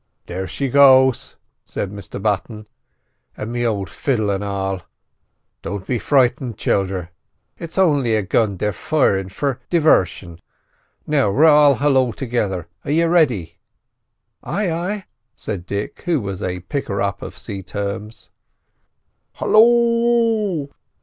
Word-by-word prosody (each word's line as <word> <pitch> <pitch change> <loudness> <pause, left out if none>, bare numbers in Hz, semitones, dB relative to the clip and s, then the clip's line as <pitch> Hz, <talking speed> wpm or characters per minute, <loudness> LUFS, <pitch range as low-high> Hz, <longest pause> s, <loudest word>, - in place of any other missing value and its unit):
"There 95 +2 -5
she 135 +10 -3
goes," 130 -1 +5 0.3
said 100 - -5
Mr 100 -1 -8
Button; 105 +1 -2 0.7
"an' 110 +2 -5
me 120 0 -1
old 100 -4 -2
fiddle 110 - -1
an' 100 0 -2
all. 95 -2 -3 0.8
Don't 100 -2 -5
be 125 -3 -1
frightened, 125 -4 +1
childer; 95 -3 -1 0.5
it's 170 +1 -8
only 145 -11 +3
a 105 - 0
gun 100 0 +1
they're 105 +2 -1
firin' 95 - +1
for 135 +6 -2
divarsion. 95 - +2 0.7
Now 140 -8 +2
we'll 140 +11 +4
all 145 -2 +6
halloo 130 -2 +2
togither—are 95 - -4
yiz 165 +3 +2
ready?" 110 - +1 0.8
"Ay, 200 -4 -2
ay," 185 +4 -3 0.3
said 95 -8 -5
Dick, 100 +1 -4
who 170 -4 +1
was 100 -3 -5
a 90 -1 -3
picker 100 - -3
up 100 0 -2
of - - -8
sea 100 -4 -6
terms. 100 +3 -6 1.0
"Halloo!" 230 -6 +3
115 Hz, 125 wpm, -20 LUFS, 100-150 Hz, 1.0 s, all